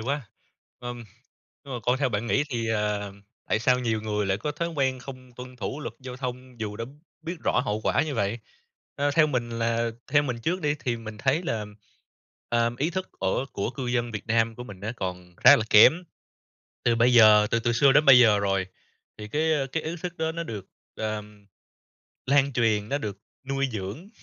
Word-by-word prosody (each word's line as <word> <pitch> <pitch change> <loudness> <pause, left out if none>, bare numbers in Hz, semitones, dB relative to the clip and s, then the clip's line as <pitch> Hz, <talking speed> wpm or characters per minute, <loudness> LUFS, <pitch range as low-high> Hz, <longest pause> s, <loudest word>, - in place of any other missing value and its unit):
quá! 135 +1 -3 0.5
Ừm, 120 -1 -6 0.6
nhưng 135 -2 -7
mà 120 - -4
còn 125 +4 +1
theo 140 - +1
bạn 110 +1 -2
nghĩ 140 +4 +2
thì, 115 -3 -2
ờ, 105 -2 -1 0.4
tại 110 - +2
sao 125 +2 +3
nhiều 115 -3 -1
người 105 -2 -1
lại 95 0 0
có 150 +7 -3
thói 170 +3 -3
quen 135 -5 0
không 130 -1 -11
tuân 125 0 -9
thủ 135 +6 -4
luật - - -6
giao 125 -1 -8
thông 125 -2 -7
dù 105 -1 -4
đã 115 - -4 0.4
biết 170 +2 -5
rõ - - +2
hậu 105 +1 -1
quả - - +2
như 150 -3 -3
vậy? 100 +4 -1 0.6
Ơ, 145 0 +1
theo 155 +1 +4
mình 125 -5 -2
là 115 0 0 0.2
theo 145 0 +5
mình 125 -4 -3
trước 180 +8 -1
đi 145 0 +1
thì 120 -2 -1
mình 110 -2 -9
thấy 140 +8 +1
là, 110 -10 -2 0.8
ờm, 120 0 +1
ý 155 +6 0
thức 185 +1 -4
ở 95 +7 0
của 100 - -2
cư 130 0 -5
dân 120 -1 0
Việt 105 - -6
Nam 115 0 +1
của 125 - -8
mình 95 -5 -11
á 110 +3 -4
còn 90 -2 -6
khá - - +8
là 110 - -1
kém. 160 +12 +7 0.8
Từ 120 - +3
bây 120 +2 +4
giờ, 105 -2 +7
từ 115 - +2
từ 120 0 0
xưa 135 +3 +5
đến 150 +2 +5
bây 135 -3 +9
giờ 110 -4 +6
rồi, 95 -2 0 0.5
thì 105 0 -7
cái, 155 +6 +1
ơ, 135 -2 0
cái 155 +4 -3
ý 165 +2 -4
thức 175 -1 -5
đó 160 0 -1
nó 170 +1 -4
được, 105 - -7 0.3
ờm, 105 -1 -5 0.8
lan 140 0 +3
truyền, 110 -3 +1
nó 140 - +1
được 105 -7 -5 0.3
nuôi 135 0 0
dưỡng. 110 - -6
120 Hz, 215 wpm, -26 LUFS, 110-140 Hz, 0.8 s, bây